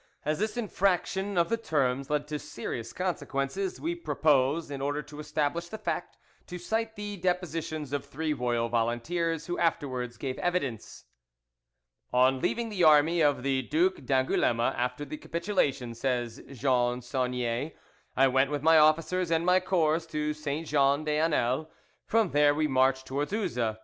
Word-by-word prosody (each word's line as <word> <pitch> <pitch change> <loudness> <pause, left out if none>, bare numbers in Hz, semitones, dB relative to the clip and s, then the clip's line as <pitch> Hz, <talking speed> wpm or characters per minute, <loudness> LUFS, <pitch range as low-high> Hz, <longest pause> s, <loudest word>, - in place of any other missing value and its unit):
As 155 +2 0
this 215 +3 -2
infraction 195 -2 0
of 170 - +3
the 230 - +1
terms 140 - 0
led 150 0 0
to 150 -1 -3
serious 115 -5 -6
consequences, 175 +1 -2
we 335 +2 -2
propose, 150 - +1
in 140 -1 -5
order 145 +2 -1
to 150 - -12
establish 155 +3 -2
the 220 - -6
fact, - - -4 0.3
to 180 - -6
cite 220 +5 -2
the 205 0 -5
depositions 165 -5 -2
of 145 - -1
three 150 +2 -3
royal 120 -3 0
volunteers 135 +9 -1
who 175 +1 -3
afterwards 130 -7 -1
gave 130 +2 -4
evidence. 145 -11 -3 1.1
"On 130 +1 +4
leaving 235 - -1
the 195 -5 -1
army 155 +2 +5
of 145 -4 +2
the 135 -1 +1
Duc 360 - +1
d'Angouleme 130 -3 +1 0.2
after 125 +4 -2
the 155 +2 -6
capitulation," 165 - -1
says 120 -1 -2
Jean 125 -2 +1
Saunier, 125 +2 -2 0.4
"I 135 +1 +6
went 135 +1 +2
with 145 -1 -3
my 160 0 +6
officers 165 +4 +3
and 165 0 +1
my 180 +1 +5
corps 170 -3 +1
to 150 -1 -2
Saint 150 +1 -4
Jean 140 0 +3
des 150 0 0
Anels. 150 -2 +1 0.4
From 225 -4 +2
there 145 0 +4
we 155 0 +1
marched 130 -1 +2
towards 140 +4 -3
Uzes. 120 - -1
150 Hz, 160 wpm, -28 LUFS, 130-175 Hz, 1.1 s, I